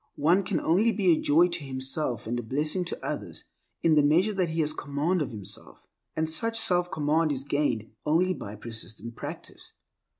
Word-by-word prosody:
One 170 +7 +4
can 185 - -1
only 205 +8 +3
be 195 -5 +3
a 160 - +3
joy 165 +5 +5
to 170 -3 -3
himself 130 -2 -2
and 120 +2 -2
a - - -2
blessing 150 - 0
to 175 - -5
others - - -5 0.4
in 165 - +5
the 150 - +6
measure 170 +9 +3
that 185 -4 0
he 160 0 0
has 155 0 +1
command 150 +6 -1
of 140 - -1
himself; 105 -5 -8 0.3
and 160 0 0
such 225 +8 +1
self 180 -3 +3
command 155 +1 +1
is 135 -2 -2
gained 140 -6 -1
only 180 +5 +2
by 105 - -7
persistent 115 0 -8
practice. - - -8
155 Hz, 190 wpm, -27 LUFS, 130-175 Hz, 0.4 s, the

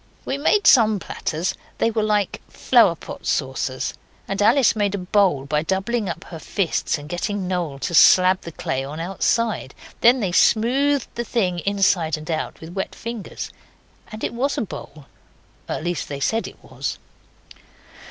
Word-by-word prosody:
We 270 - -1
made 360 +9 +2
some 220 -4 +6
platters 175 0 -3 0.2
they 230 - +1
were 220 -1 0
like 210 -2 0
flower 230 -9 +4
pot - - -9
saucers; 130 -1 -1 0.3
and 195 +1 -2
Alice 235 +5 +4
made 205 -2 0
a - - -2
bowl 180 -6 +2
by 150 +2 0
doubling 195 +5 -1
up 170 +1 -5
her 165 - -9
fists 180 -1 -1
and 145 0 -10
getting 185 +3 -3
Noel 175 -6 -2
to 170 - -4
slab 185 +3 +6
the 170 - -8
clay 135 -3 -3
on 145 +4 -7
outside. 195 - -1 0.2
Then 245 +3 +5
they 195 -6 -1
smoothed 260 +8 +3
the 235 - -3
thing 190 -7 -1
inside 190 -6 +2
and 155 +2 -6
out 155 - -3
with 160 +1 -10
wet 190 0 -4
fingers, 230 -2 -6 0.6
and 215 0 -8
it - - -2
was 270 +4 -1
a - - 0
bowl 155 -8 -8 0.6
at - - -3
least 175 0 -3
they 140 -1 -5
said 225 +11 0
it - - -12
was. - - -5
190 Hz, 170 wpm, -22 LUFS, 165-225 Hz, 0.6 s, some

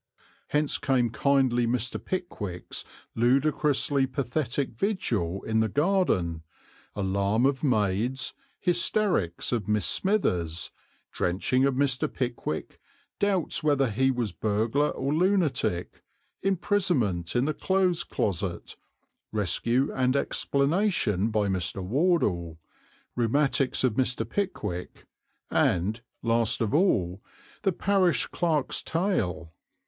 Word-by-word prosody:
Hence 150 0 0
came 125 -4 +1
kindly 125 -1 +2
Mr. 120 +1 -2
Pickwick's 105 - -4 0.3
ludicrously 140 +2 +2
pathetic 130 +1 -2
vigil 110 - -1
in 110 0 0
the 110 0 +2
garden, 140 - +1 0.5
alarm 100 +4 +1
of 140 +1 +1
maids, 115 0 +1 0.3
hysterics 175 - +1
of 115 -5 -1
Miss 105 -1 +1
Smithers, 90 - 0 0.4
drenching 105 +9 +1
of 140 -2 +1
Mr. 135 -1 +1
Pickwick, 120 -10 -4 0.4
doubts 195 -4 +1
whether 140 -5 +2
he 130 +5 +2
was 120 -5 -1
burglar 110 +9 0
or 135 +2 -2
lunatic, 160 - 0 0.4
imprisonment 175 - 0
in 120 +2 +3
the 155 - 0
Clothes 185 +1 +1
Closet, 95 -3 -3 0.5
rescue 115 +5 +1
and 130 0 +1
explanation 140 - +1
by 105 -2 +1
Mr. 95 0 -2
Wardle, 100 - +1 0.6
rheumatics 130 +2 +1
of 130 -4 +3
Mr. 125 +1 0
Pickwick, 90 - -4 0.5
and, 105 +7 +1 0.2
last 115 -1 +2
of 115 +1 -1
all, 100 - +2 0.4
the 195 - +2
Parish 185 0 +2
Clerk's 155 -6 0
tale. 105 - -1
125 Hz, 105 wpm, -27 LUFS, 105-150 Hz, 0.6 s, in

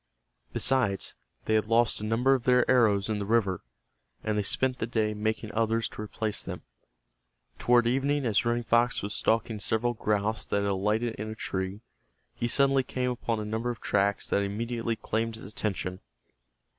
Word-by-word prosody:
Besides, 120 -8 +1 0.3
they 110 - +1
had 110 -1 +2
lost 115 -1 +2
a - - -5
number 115 +5 +3
of 130 -3 -1
their 125 -1 +4
arrows 105 -6 +4
in 110 -1 -1
the 100 - -3
river, 100 -5 +1 0.6
and 110 - 0
they 105 - +2
spent 130 +5 +2
the 110 - -1
day 110 -2 0
making 110 +1 -2
others 115 0 +1
to - - -8
replace 105 0 -3
them. - - -7 1.0
Toward 120 -1 +4
evening 135 +3 +1
as 110 -4 +2
Running 120 0 0
Fox 120 +1 +2
was 105 +1 -3
stalking 110 -1 0
several 110 +4 0
grouse 110 0 -1
that 100 - -1
had 100 - +1
alighted 105 +4 0
in 110 +1 -4
a 110 - -6
tree, 95 0 -3 0.5
he 120 - -2
suddenly 135 +1 +4
came 125 -1 -2
upon 115 -2 -2
a 105 - -4
number 110 +3 -2
of 120 -3 -4
tracks 100 0 +1
that 100 - +3
immediately 115 +3 -2
claimed 115 +1 -2
his 110 - -9
attention. 95 -3 -3
110 Hz, 180 wpm, -28 LUFS, 105-120 Hz, 1.0 s, their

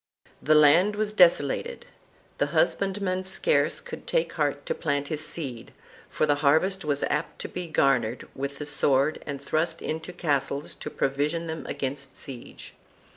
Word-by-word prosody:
The 155 - +4
land 165 +8 +6
was 210 0 -1
desolated; 180 - +3 0.5
the - - +2
husband 200 - +1
man 185 -1 -1
scarce 315 - +1
could - - -9
take - - 0
heart - - -1
to 485 - -1
plant 145 - -2
his 155 -1 -3
seed, 135 -7 -6 0.4
for - - +1
the 150 - +3
harvest 180 +7 +3
was 145 -2 0
apt 150 +2 -1
to - - -4
be 180 -1 -5
garnered 130 -6 +1
with 140 +1 -4
the 150 - -5
sword 145 0 +2
and 140 -2 -4
thrust 160 +4 -1
into 160 +3 -4
castles 145 -4 -1
to - - -7
provision 150 +5 -1
them 160 -1 -5
against 135 0 -4
siege. 130 -3 -10
155 Hz, 160 wpm, -26 LUFS, 140-180 Hz, 0.5 s, land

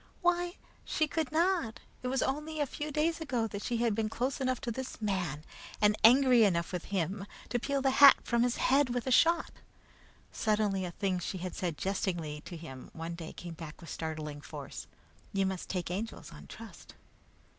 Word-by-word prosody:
Why, 350 0 +2 0.3
she 310 - +1
could 310 -3 -2
not! 330 -7 +1 0.2
It 255 - -3
was 260 +1 +1
only 300 +3 -2
a 290 - +2
few 295 +3 -5
days 320 +3 0
ago 250 -7 0
that 205 -2 -5
she 240 +1 -1
had 230 -1 +2
been 215 0 0
close 255 +5 -2
enough 255 -1 0
to 235 - -2
this 260 +3 -5
man 180 -8 -2 0.4
and 210 0 +4
angry 250 0 +7
enough 170 -5 +2
with 180 -2 -4
him 195 +1 -2 0.2
to 245 - 0
peel 275 +2 -1
the 270 - +4
hat 280 -1 +12
from 235 -1 +1
his 245 0 +2
head 275 0 +3
with 245 0 -2
a 260 - -1
shot! 335 +6 +4 0.8
Suddenly 210 -3 +1
a 175 - -4
thing 185 0 -1
she 180 +2 -4
had 180 0 -5
said 175 -6 -3
jestingly 175 -6 -2
to 175 - -7
him 135 -6 -9
one 165 +1 -5
day 170 -1 -7
came 175 -1 -8
back 160 -1 -9
with 170 - -9
startling 155 -2 -4
force: - - -8 0.5
"You 195 -1 +2
must 190 -1 -3
take 180 -2 -2
Angels 210 +5 -5
on - - -12
trust." - - -11
215 Hz, 195 wpm, -31 LUFS, 180-265 Hz, 0.8 s, hat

